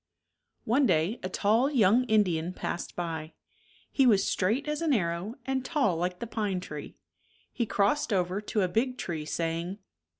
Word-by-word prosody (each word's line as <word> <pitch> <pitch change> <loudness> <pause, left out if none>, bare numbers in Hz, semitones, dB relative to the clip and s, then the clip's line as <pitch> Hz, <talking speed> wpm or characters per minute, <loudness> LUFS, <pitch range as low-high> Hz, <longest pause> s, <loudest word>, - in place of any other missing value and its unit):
One 260 +4 +3
day 170 +7 +1
a 185 - -3
tall 220 +8 +2
young 240 -2 +4
Indian 185 -7 +1
passed 175 - -4
by. 160 -2 -4 0.6
He 270 -2 +4
was 205 -5 +4
straight 225 +11 0
as 300 +1 -2
an 320 -3 +2
arrow 175 +1 -1
and 265 -1 -1
tall 265 - +1
like 180 +2 -2
the 235 - -5
pine 210 -4 -2
tree. 150 -5 -8 0.6
He 235 - -1
crossed 205 +8 +1
over 185 0 0
to 210 -1 0
a - - +2
big 250 +7 0
tree, 160 -8 -4
saying. 165 +4 -2
200 Hz, 165 wpm, -28 LUFS, 175-245 Hz, 0.6 s, young